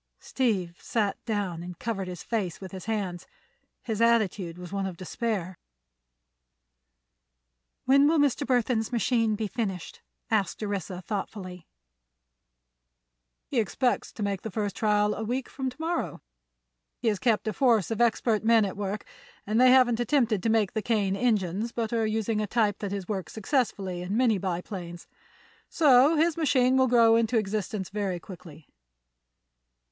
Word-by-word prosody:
Steve 190 -9 -1
sat 210 -4 -1
down 200 -7 -2
and 175 0 -8
covered 200 -5 -3
his 180 -2 -7
face 195 -8 -2
with 190 -2 -9
his 190 -1 -8
hands. 195 -6 -3 0.6
His 220 -2 -3
attitude 210 -7 +2
was 180 +1 -9
one 195 -1 -1
of 180 -3 -7
despair. 185 -2 -3 2.3
"When 275 +2 +5
will 320 +2 +3
Mr. 285 -4 +2
Burthon's 245 -2 +1
machine 230 -2 +1
be 220 +1 -2
finished?" 195 -6 -4 0.3
asked 215 -1 0
Orissa, 190 -3 -4
thoughtfully. 185 -3 -6 1.8
"He 260 - -1
expects 235 +4 0
to 215 - -5
make 200 -2 -2
the 220 - -5
first 205 -1 -3
trial 210 -1 +2
a 220 - -4
week 250 +4 -2
from 265 -1 -4
to 250 - -13
morrow. 335 +2 -3 0.7
He 240 - -3
has 205 -3 -1
kept 225 -3 +1
a 215 - 0
force 230 -4 +2
of 225 - -1
expert 225 -2 +2
men 225 -1 +5
at 195 - -4
work, 205 +1 -4 0.4
and 220 +4 +2
they 255 - +7
haven't 250 -2 +5
attempted 240 -5 +1
to 225 - 0
make 220 -3 +2
the 220 - -1
Kane 205 -3 0
engines, 210 -1 0
but 230 -1 -3
are 225 -1 +1
using 220 0 -1
a 210 - -2
type 210 -2 +1
that 200 -2 -4
has 200 -2 -4
worked 195 -4 -3
successfully 200 -6 -1
in 190 +4 -2
many 235 -5 +3
biplanes. 175 -1 -5 0.6
So 285 0 +5
his 320 +1 +2
machine 260 -4 +3
has 260 - +4
grown 230 -1 +5
into 230 +1 +1
existence 210 -2 -2
very 195 -3 -2
quickly." 165 -4 -12
215 Hz, 155 wpm, -27 LUFS, 190-235 Hz, 2.3 s, they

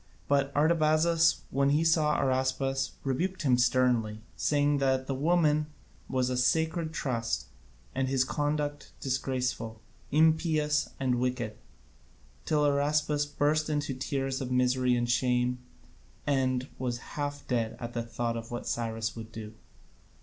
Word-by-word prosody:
But 140 -1 +2
Artabazus, 160 +2 +3
when 140 +1 +2
he 150 +3 +3
saw 160 -2 +3
Araspas, 135 0 0
rebuked 175 +8 -1
him 130 -4 +4
sternly, 120 -4 +2
saying 145 -1 +2
that 130 -1 +1
the 135 - -2
woman 155 +1 +2 0.4
was 130 -1 0
a 125 - -1
sacred 160 +5 +1
trust, 115 -7 -2 0.5
and 130 0 0
his 130 -1 +2
conduct 145 +1 -2
disgraceful, 125 -4 -2 0.3
impious, 155 -1 +2
and 125 -2 +1
wicked, 125 -3 -1 0.9
till 150 -1 +2
Araspas 145 +1 +1
burst 150 +2 +1
into 145 -2 -1
tears 135 0 -2
of 130 - -3
misery 125 0 +2
and 120 0 0
shame, 125 0 +1 0.7
and 130 -2 +1
was 125 -2 -1 0.2
half 145 -1 -4
dead 115 -3 -1
at 120 -1 -6
the 120 - -1
thought 115 0 -3
of 115 0 -6
what 120 - -5
Cyrus 115 -1 -2
would 115 -1 -8
do. 110 -1 -8
135 Hz, 135 wpm, -29 LUFS, 125-150 Hz, 0.9 s, him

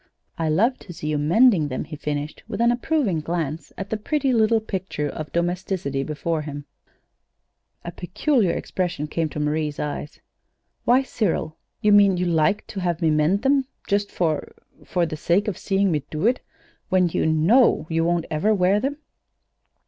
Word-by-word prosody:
"I 165 -1 -1
love 225 +12 +2
to 175 - -10
see 150 -2 -5
you 150 -1 0
mending 175 - +4
them," 130 -2 -3
he 155 - -8
finished, 145 0 -4
with 215 -2 -5
an 235 +1 +4
approving 245 - 0
glance 160 -1 -3
at 195 +1 -6
the 220 - 0
pretty 270 +4 0
little 225 0 +3
picture 190 -8 -3
of 150 +1 -6
domesticity 170 -5 -1
before 155 +3 -2
him. 145 -1 -7 1.2
A 170 - -4
peculiar 185 - 0
expression 175 -4 -2
came 160 +1 -2
to 150 - -6
Marie's 150 0 -1
eyes. 150 +1 -5 0.7
"Why, 255 +3 +4
Cyril, 190 -10 -1 0.3
you 210 -2 +3
mean 200 -2 +6
you 180 - 0
like 165 +3 +2
to 200 - -6
have 175 -3 -1
me 165 -3 +2
mend 155 +7 +2
them 270 -1 +3 0.2
just 200 -1 +1
for 160 -4 -1 0.3
for 175 -2 0
the 155 -1 -5
sake 180 +7 +1
of 205 - -1
seeing 195 -1 +1
me 150 -2 0
do 155 +5 -2
it, 245 +3 +3 0.5
when 185 -2 +3
you 160 - 0
know 165 +12 +4
you 165 0 0
won't 170 0 +1
ever 205 +8 +2
wear 190 +2 +3
them?" 275 +5 -2
175 Hz, 175 wpm, -23 LUFS, 155-210 Hz, 1.2 s, mean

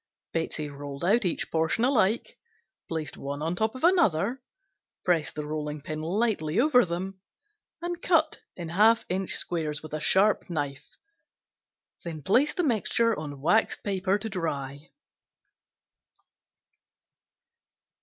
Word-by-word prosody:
Betsey 160 -2 -2
rolled 140 +1 -6
out 215 +3 +3
each 175 - -1
portion 160 +8 +1
alike, 235 -4 +1 0.5
placed 160 -2 -3
one 140 +2 -5
on 165 +2 -1
top 220 +5 0
of 255 - -8
another, 255 - +3 0.6
pressed 170 -4 +1
the 150 - -4
rolling 150 0 -4
pin 155 +2 -5
lightly 185 -1 0
over 250 -3 +5
them 185 +2 -5 0.6
and 345 0 -3
cut 320 -3 +2 0.2
in 170 -2 -6
half 220 +6 +4
inch 185 +1 -1
squares 155 -4 -2
with 155 - -9
a 155 - -1
sharp 200 +5 +3
knife, 145 -4 -4 1.1
then 160 -4 -6
placed 280 - +2
on 225 - 0
waxed 195 +9 +2
paper 195 -1 +1
to 215 +2 -5
dry. 145 -8 -3
180 Hz, 120 wpm, -27 LUFS, 155-225 Hz, 1.1 s, over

